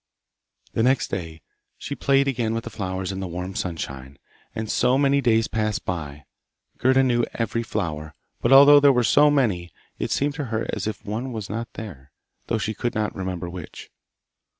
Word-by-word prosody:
The - - +1
next 130 +3 +2
day 80 -4 -5 0.3
she - - -5
played 140 0 +2
again 120 -4 0
with 115 - -3
the - - -7
flowers 95 -2 -3
in 95 - -5
the 95 - -3
warm 90 +2 -5
sunshine, 70 -7 -5 0.4
and 110 0 -3
so 125 +4 +2
many 140 0 +3
days 115 -3 +3
passed 110 -1 -2
by. 75 -5 -5 0.5
Gerda 130 +1 +4
knew 120 -2 +2
every 115 0 -1
flower, 80 -9 -4 0.3
but 120 - +1
although 140 +2 +9
there 140 -1 +6
were 125 -2 +2
so 150 +5 +5
many, 105 -12 +1 0.3
it - - -2
seemed 145 +1 0
to 145 -1 -4
her 115 -1 -2
as 105 -1 -2
if 105 -3 -5
one 115 +6 -3
were 110 -3 -4
not 115 +2 -5
there, 75 -12 -9 0.4
though 115 - 0
she 110 0 -2
could 120 +3 -3
not 105 -1 -1
remember 90 -2 -4
which. 85 -2 -9
110 Hz, 185 wpm, -24 LUFS, 90-125 Hz, 0.5 s, although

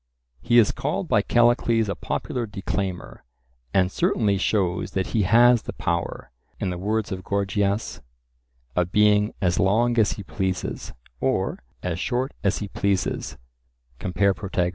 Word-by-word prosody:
He 120 - +3
is 115 -3 +6
called - - -2
by - - +3
Callicles 120 -2 +3
a 100 - -1
popular 120 +2 -3
declaimer, 95 -2 -4 0.5
and 95 -1 +2
certainly 100 -1 +1
shows 90 -4 0
that 95 -1 -1
he 110 - +3
has 120 +4 +5
the - - -7
power, - - -3 0.3
in 95 - -1
the 90 - -5
words 105 +3 -1
of 95 -1 -4
Gorgias, 100 +1 -1 0.7
of 90 0 0
being 105 0 +3
"as 90 -1 +2
long 115 +5 +3
as 105 - +3
he 100 - -8
pleases," 95 -1 -3 0.3
or - - 0 0.2
"as 90 -2 -2
short 125 +6 -1
as 100 0 +2
he 105 - -4
pleases" 100 -2 -1 0.6
(compare 95 +2 +1
Protag.). 95 -3 -1
100 Hz, 145 wpm, -24 LUFS, 95-110 Hz, 0.7 s, is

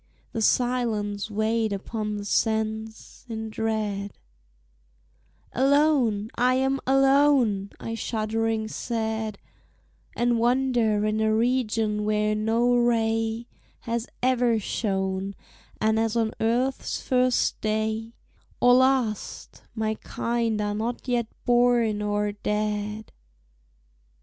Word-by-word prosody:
The 225 - -3
silence 220 -4 0
weighed 220 +1 0
upon 210 +1 -3
the 205 - -6
sense; 220 +1 -2
in 220 -1 -5
dread, 215 -3 -2 1.4
"Alone, 265 -6 +2
I 250 +1 +2
am 265 +1 +1
alone," 270 -7 +3
I 225 - -5
shuddering 225 0 -1
said, 220 -2 -3 0.8
"And 240 -1 +1
wander 240 -3 +2
in 215 +1 0
a 220 0 +2
region 225 -3 +1
where 210 0 +1
no 225 +3 +2
ray 225 -1 +1 0.4
Has 235 0 -3 0.2
ever 245 -2 +3
shone, 195 -2 -2 0.4
and 220 0 +2
as 225 0 0
on 225 -2 +1
earth's 245 +4 0
first 255 -1 +1
day 220 +1 -2 0.4
Or 245 0 +6
last, 255 -4 +1
my 220 -1 0
kind 230 -2 -1
are 205 0 -1
not 230 +5 -3
yet 240 -2 0 0.2
born 240 -3 +3
or 205 0 0
dead." 210 +1 -3
225 Hz, 105 wpm, -25 LUFS, 215-240 Hz, 1.4 s, Or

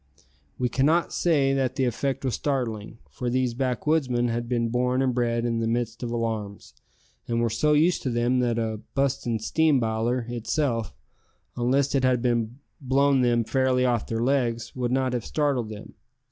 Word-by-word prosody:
We 125 - +1
cannot 150 +7 +1
say 145 -6 +2
that 130 -1 0
the 135 - +1
effect 135 +2 -2
was 130 - 0
startling, 115 -6 -2
for 125 - -3
these 125 -1 0
backwoodsmen 125 0 0
had 120 0 -3
been 115 -2 0
born 125 +2 +1
and 130 -1 +1
bred 120 -1 0
in 115 -1 0
the 115 - 0
midst 115 0 -2
of 120 - -3
alarms, 110 -4 -4 0.5
and 115 0 0
were 115 -1 +1
so 150 +7 +2
used 160 +4 +3
to 130 - -2
them 120 +1 +1
that 120 -2 +1
a 110 -2 -2
"bustin' 130 -4 0
steam 150 +6 +2
biler" 115 +2 -1
itself, 120 0 -2 0.6
unless 130 +3 +1
it 135 -2 +1
had 130 -2 +2 0.6
blown 135 0 +3
them 120 -1 +2
fairly 130 +1 +1
off 120 -3 0
their 115 0 -1
legs, 120 -3 0
would 125 -2 -1
not 130 -1 +1
have 120 -3 -2
startled 140 -7 -1
them. 105 -1 -9
125 Hz, 175 wpm, -25 LUFS, 115-135 Hz, 0.6 s, used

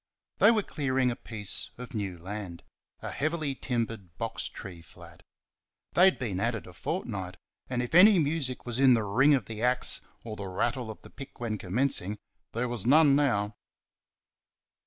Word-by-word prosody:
They 205 - +7
were 220 -3 +3
clearing 130 -5 0
a - - -3
piece 105 -4 -5
of 125 0 -9
new 100 -5 -3
land 95 -1 -7 0.4
a - - -4
heavily 155 -1 -1
timbered 115 -9 -4
box 115 0 -2
tree 90 -4 -9
flat. 80 - -15 0.7
They 180 - +6
had 190 - +4
been 105 -8 -3
at 120 +3 +1
it 105 - -7
a - - -12
fortnight, 95 -2 -4 0.3
and 125 -1 -1
if 125 - -6
any 195 +4 +8
music 150 -5 -1
was 120 0 -3
in 130 -2 +6
the 115 - 0
ring 135 +9 +4
of 125 -7 -2
the 110 0 -6
axe 125 +1 +2 0.2
or 110 -2 -6
the 100 -2 -6
rattle 115 +5 -2
of 110 - -9
the - - -13
pick 135 - -11
when 110 -3 -3
commencing, 105 0 0 0.4
there 120 +2 -1
was 120 -5 -2
none 145 +2 +6
now. 105 -8 +1
120 Hz, 180 wpm, -29 LUFS, 105-135 Hz, 0.7 s, any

